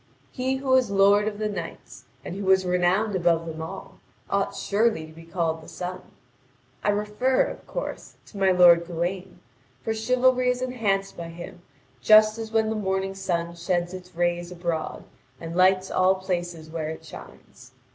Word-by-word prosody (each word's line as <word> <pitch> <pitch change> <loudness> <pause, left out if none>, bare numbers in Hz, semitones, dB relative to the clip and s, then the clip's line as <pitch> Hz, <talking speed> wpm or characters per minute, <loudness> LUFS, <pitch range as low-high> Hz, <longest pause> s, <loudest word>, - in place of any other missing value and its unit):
He 260 0 -1
who 265 0 -5
was 260 -3 +4
lord 200 +1 +4
of 210 -1 -3
the 215 0 -1
knights, 185 -5 -7 0.2
and - - -5
who 200 - -5
was 190 0 +4
renowned 180 +4 +1
above 170 -2 +2
them 160 -1 -6
all, 160 - -8 0.3
ought - - 0
surely 210 -5 +1
to 155 - -14
be 165 +1 -13
called 165 -1 -2
the - - -14
sun. 185 +1 -6 0.8
I - - +1
refer, 210 +5 +1
of - - -7
course, - - -6
to 200 - -11
my 195 -1 +4
lord 175 -2 +6
Gawain, 180 +2 -4 0.4
for 225 - -1
chivalry 250 +3 +2
is 250 0 -1
enhanced 210 -6 -1
by 170 -1 -7
him 175 +2 -10 0.4
just 215 - +6
as 220 -1 -6
when 220 -1 +1
the - - -1
morning 190 -2 -1
sun 170 -3 -2
sheds 175 +1 -2
its 180 -1 -10
rays 175 0 -1
abroad 170 -3 -3 0.4
and 165 0 -7
lights 185 +1 +3
all 185 +1 +3
places 175 -4 -4
where 160 -1 -3
it 160 - -8
shines. - - -13
185 Hz, 175 wpm, -25 LUFS, 175-215 Hz, 0.8 s, lord